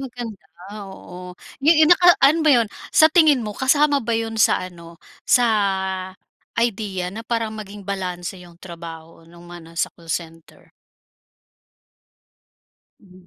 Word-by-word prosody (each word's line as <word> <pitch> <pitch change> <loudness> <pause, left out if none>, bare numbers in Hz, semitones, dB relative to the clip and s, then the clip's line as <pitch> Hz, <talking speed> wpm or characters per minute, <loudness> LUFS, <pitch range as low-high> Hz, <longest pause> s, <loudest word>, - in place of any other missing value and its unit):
maganda, 240 -6 -7 0.5
oo. 180 -1 -11 0.2
'Yo 300 +4 +4
'yon 315 +2 +6
naka 355 0 +6
ano 310 +4 +5
ba 310 - +2
'yon, 235 -6 +4 0.2
sa 315 0 +5
tingin 300 -9 +4
mo 210 - -5
kasama 285 +4 +2
ba 230 -2 -1
'yon 225 -1 -3
sa - - +4
ano, 170 -2 -12 0.3
sa 245 - +5 1.1
idea 200 -6 -2
na 225 - -7
parang 230 -1 -3
maging 205 -2 -9
balanse 185 -2 -5
'yong 175 -1 -15
trabaho 165 -2 -11
no'ng 170 0 -16
mga 175 0 -11
nasa 165 0 -3
call 165 -1 -19
center? 165 -1 -7 2.3
Mhm. 185 -3 -19
205 Hz, 135 wpm, -21 LUFS, 175-245 Hz, 2.3 s, yon